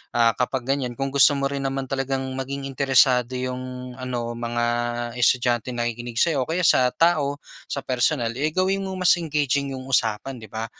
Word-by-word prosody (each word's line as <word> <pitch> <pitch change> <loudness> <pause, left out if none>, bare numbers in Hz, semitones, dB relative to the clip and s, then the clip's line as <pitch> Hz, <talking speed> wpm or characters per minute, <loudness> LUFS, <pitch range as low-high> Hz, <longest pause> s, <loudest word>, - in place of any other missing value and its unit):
ah, 115 -1 +5
kapag 125 0 -1
ganyan 125 -3 -4
kung 135 +2 -3
gusto 140 +1 +5
mo 140 0 0
rin 140 -1 -3
naman 135 0 -3
talagang 135 0 -1 0.2
maging 140 +1 -4
interesado 130 -2 +3
'yong 125 0 -5
ano 120 -2 -3
mga 120 0 -2 0.6
estudyanteng 120 0 +2
nakikinig 120 0 -3
sa'yo 155 -6 +1
o - - -10
kaya 175 +3 0
sa 125 - +5
tao 155 -4 +2 0.3
sa - - -3
personal 125 -1 0
eh, 150 +4 0
gawin 190 +1 +1
mong 190 -1 -4
mas - - +8
engaging 140 -3 -1
'yong 130 0 -8
usapan, 120 +2 0
'di 110 - -11
ba? 110 +2 -4
130 Hz, 180 wpm, -23 LUFS, 120-140 Hz, 0.6 s, mas